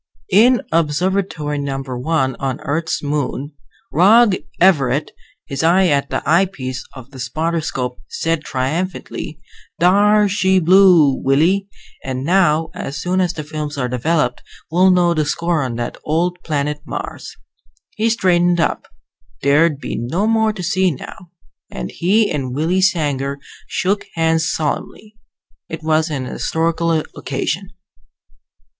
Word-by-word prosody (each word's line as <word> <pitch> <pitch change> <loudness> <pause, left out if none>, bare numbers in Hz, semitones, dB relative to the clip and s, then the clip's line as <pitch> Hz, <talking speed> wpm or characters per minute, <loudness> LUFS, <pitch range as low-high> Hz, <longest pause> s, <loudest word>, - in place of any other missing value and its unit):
In 235 +6 +5
Observatory 165 -1 0
No. 135 -1 -3
1 130 +1 -1
on 135 -2 -2
Earth's 160 +3 -2
moon, 145 0 -3 0.4
Rog 205 +5 +5 0.2
Everett, 150 -6 +3 0.3
his 140 -2 -4
eye 180 +3 +4
at 140 -1 +1
the - - -2
eyepiece 155 -7 0
of 130 0 -12
the 135 - -11
spotter 160 +7 -2
scope, 125 -4 -4
said 165 -1 -2
triumphantly, 155 +4 -3 0.4
"Thar 205 +4 +4
she 190 -1 +2
blew, 180 -4 +6
Willie. 170 +9 +2 0.4
And 130 0 -4
now, 165 -1 +2
as 140 0 -5
soon 180 +4 0
as 180 -1 0
the 155 - -6
films 150 -1 -5
are 125 -2 -1
developed, 125 +1 0 0.3
we'll 180 +3 +4
know 175 -2 +3
the 155 -2 +1
score 170 +2 0
on 125 -3 -3
that 120 0 -5
old 175 +3 0
planet 150 -1 -2
Mars." - - -7 0.6
He 225 +1 +1
straightened 175 -5 +2
up 165 - -1 0.6
there'd 145 +2 +3
be - - -5
no 130 - -1
more 220 0 +2
to 200 -4 -7
see 185 +1 +2
now 170 +4 -9 0.4
and 60 -1 -6
he 205 +5 +2
and 130 -5 -3
Willie 170 +6 +1
Sanger 145 -7 0 0.3
shook 200 +2 -1
hands 160 0 +1
solemnly. 210 +7 -4 0.5
It 160 -1 -6
was 155 +1 +1
an 135 -4 -3
historical 165 +5 -1 0.2
occasion. 165 +7 -3
160 Hz, 135 wpm, -18 LUFS, 140-185 Hz, 0.6 s, blew